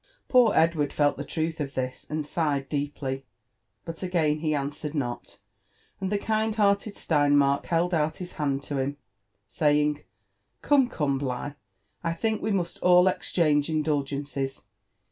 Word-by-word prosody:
S29 - - -48
Poor 245 -4 +5
Edward 160 -3 +3
felllMe 145 -1 +1
Irulh 160 0 -2
of 140 -2 -4
this 130 0 -4
and 155 0 -2
sighed 145 -3 -1
deeply, 140 -2 -3 0.6
but 165 0 -7
again 165 -5 +1
he 155 -1 0
answered 145 +2 -3
not: 120 -4 -4 0.6
and 190 0 -3
the 205 - +2
kind 220 +1 0
hearted 205 0 +2
Steinmark 145 -2 +2
held 175 +2 +1
out 155 -1 +1
his 180 -1 -7
hand 140 -2 -1
to 145 - -6
htm, 140 +1 -1 0.5
saying 150 -1 +1 0.6
Come, 280 -3 +4
come, 140 - 0
Biigh, 135 +1 -3 0.5
I 165 -1 0
think 220 +6 -1
we 215 - -1
must 180 -4 -1
all 180 0 +6
exchange 155 -5 +1
indul 155 -2 +1
gences. 140 -1 -4
150 Hz, 150 wpm, -27 LUFS, 145-175 Hz, 0.6 s, all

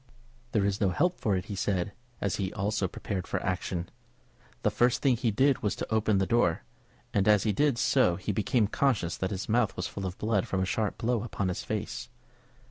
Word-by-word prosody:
"There 105 -4 +3
is 100 +1 -1
no 100 - +4
help 175 - +1
for 105 -3 +1
it," 90 0 -2
he 105 - -6
said, 95 -1 -1 0.3
as 100 - 0
he 95 -1 -2
also 105 -1 0
prepared 95 +1 -4
for - - -1
action. 90 -2 -2 0.8
The - - +3
first 120 0 +2
thing 135 -3 +4
he 120 0 0
did 135 +6 +3
was 105 - 0
to - - -4
open 110 -2 +2
the 95 - +2
door, 115 -8 +2 0.5
and 100 0 +2
as 105 -2 +5
he 105 - +1
did 145 +2 +2
so 90 -5 +3
he 95 +4 -3
became 105 +3 +2
conscious 105 -6 +1
that 95 - -1
his 100 -2 -4
mouth 110 -1 +2
was 90 - -3
full 95 +2 -4
of 90 - -6
blood 105 -3 0
from 95 - -1
a 95 - +1
sharp 105 +2 -1
blow 115 -1 0
upon 100 -4 -2
his 90 - -3
face. 115 +3 -4
105 Hz, 215 wpm, -29 LUFS, 95-115 Hz, 0.8 s, as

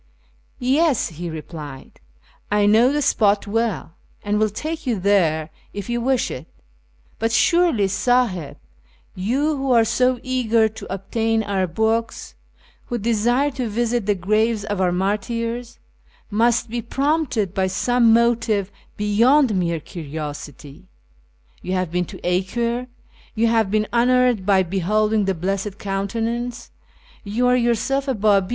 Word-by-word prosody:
" - - -39 0.2
Yes," 320 -7 +2
he 170 +1 -6
replied, 155 -3 -9 0.3
" - - -33
I 205 - +4
know 225 +5 +5
the 295 0 0
spot 205 -4 +2
well, 225 -4 -2 0.3
and 210 0 0
will 215 0 +2
take 310 +8 -5
you 230 -5 0
there 170 -5 +1 0.2
if 205 +3 -5
you 240 0 -1
wish 260 0 0
it; 135 +6 -7 0.7
but 225 +1 0
surely, 240 - +3
Sahib, 195 - 0 0.6
you 270 +11 0
who 270 -1 -1
are 230 -1 +5
so 250 +2 +1
eager 235 -3 +2
to 215 - -10
obtain 220 +3 -1
our 195 -2 -1
books, 220 +6 -1 0.5
who 240 - -2
desire 235 +5 +1
to 255 -4 -3
visit 235 0 -1
the 205 - +2
graves 215 +4 +1
of 205 -3 -2
our 180 -1 +2
martyrs, 230 +6 -2 0.5
must 230 +2 +2
be 235 +1 -3
prompted 265 - -1
by 190 -2 +1
some 235 +4 +2
motive 225 -4 +2 0.3
beyond 230 +5 +3
mere 170 -3 0
curi 155 -2 -9
osity. 145 -2 -7 0.8
You 185 - -4
have 185 -3 -1
been 180 +1 0
to - - -11
Acre, 235 +7 -1 0.5
you 230 +1 +2
have 225 -3 +2
been 215 +1 +1
honoured 245 -4 +3
by 195 -2 +4
beholding 210 +4 +1
the 195 -1 0
Blessed 195 +3 -3
Countenance, 230 +5 -3 0.5
you 215 +5 -1
are 250 0 +4
yourself 250 +3 0
a 265 - 0
Babi. 200 -3 +2
220 Hz, 145 wpm, -21 LUFS, 195-240 Hz, 0.8 s, know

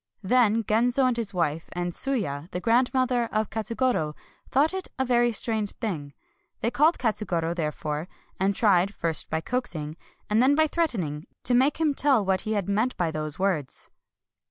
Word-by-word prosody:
Then 225 +1 +3
Genzo 240 +5 +2
and 250 -1 +2
his 230 -3 -2
wife, 165 -3 -1
and 175 0 -2
Tsuya, 180 - -2
the 180 - -4
grandmother 245 +2 +2
of 215 0 -1
Ka 225 - -3
tsugoro, 220 -9 0 0.3
thought 295 +6 +2
it 380 -1 -4
a 265 - 0
very 240 -1 +3
strange 220 -2 0
thing. 155 - -4 0.5
They 235 - 0
called 310 +6 +3
Katsugoro, 180 -8 -1
therefore; 150 -1 -3 0.3
and 195 +1 +1
tried, 200 -2 +3
first 165 -2 0
by 160 0 -1
coaxing, 165 -9 -3 0.3
and 215 +2 +2
then 270 +3 +4
by 315 +1 +4
threatening, 200 - -2 0.2
to 245 - +2
make 265 +4 +3
him 310 -3 +2
tell 270 -7 +2
what 190 -1 +2
he 220 0 -2
had 200 -3 -1
meant 220 +5 0
by 170 -2 0
those 155 -1 -4
words. 180 -9 -2
215 Hz, 175 wpm, -26 LUFS, 170-250 Hz, 0.5 s, then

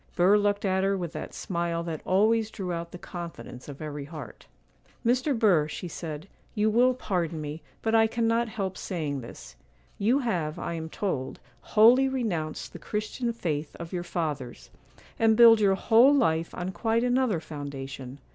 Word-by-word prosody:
Burr 185 +4 +5
looked 205 0 +1
at 190 0 +1
her 195 0 +1
with 175 -3 -4
that - - -6
smile 170 -2 -2
that 165 -2 -5
always 215 +3 +3
drew 190 -5 -4
out 170 0 -5
the - - -8
confidence 170 -8 -8
of 140 +2 -8
every 145 -2 -5
heart. 145 -6 -10 0.6
'Mr. 255 +3 +2
Burr,' 185 -10 +4
she 165 +3 -6
said, 160 0 -6 0.3
'you 215 +1 +2
will 250 +3 +4
pardon 175 -9 -2
me, 150 +1 -6 0.2
but 225 - 0
I 225 0 +5
cannot 230 0 +1
help 195 -4 -4
saying 150 -7 -3
this: 115 - -11 0.4
You 225 +6 +3
have, 175 - -1
I - - -4
am 160 -1 -5
told, 150 -9 -3 0.2
wholly 245 +5 +5
renounced 185 -13 -3
the - - -8
Christian 215 +3 -3
faith 155 -9 -3
of 170 +1 -8
your 180 - -1
fathers, 150 -8 -4 0.5
and 220 -1 +4
build 230 -2 +8
your 195 -2 +4
whole 240 +8 +5
life 165 - +1
on 180 +1 -3
quite 225 +5 0
another 250 -6 +2
foundation. 140 -4 -7
185 Hz, 170 wpm, -27 LUFS, 160-225 Hz, 0.6 s, build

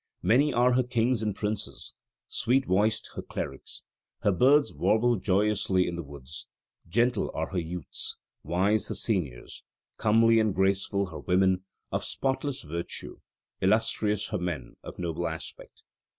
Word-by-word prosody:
Many 140 +6 +4
are 125 0 +4
her 130 - +4
kings 120 -1 +1
and 105 -2 -1
princes; 105 -10 -4 0.3
sweet 130 +3 +1
voiced 110 +2 +1
her - - -5
clerics; - - -6 0.4
her 100 - +3
birds 140 +9 +4
warble 120 +2 +3
joyously 95 -1 +2
in 85 - -3
the 85 - -3
woods: 70 0 -9 0.4
gentle 120 +4 +2
are - - -2
her 95 - 0
youths; 85 -1 -4 0.2
wise 95 +6 +1
her - - -3
seniors; 80 - -2 0.4
comely 115 +1 +5
and 110 -3 +1
graceful 95 0 +1
her - - -6
women, 95 0 +2 0.3
of - - -1
spotless 135 0 -1
virtue; 85 +2 -5 0.4
illustrious 105 +1 +2
her 105 - -1
men, 85 -8 -4
of - - -9
noble 85 -1 -2
aspect. 80 0 -8
100 Hz, 140 wpm, -28 LUFS, 90-115 Hz, 0.4 s, comely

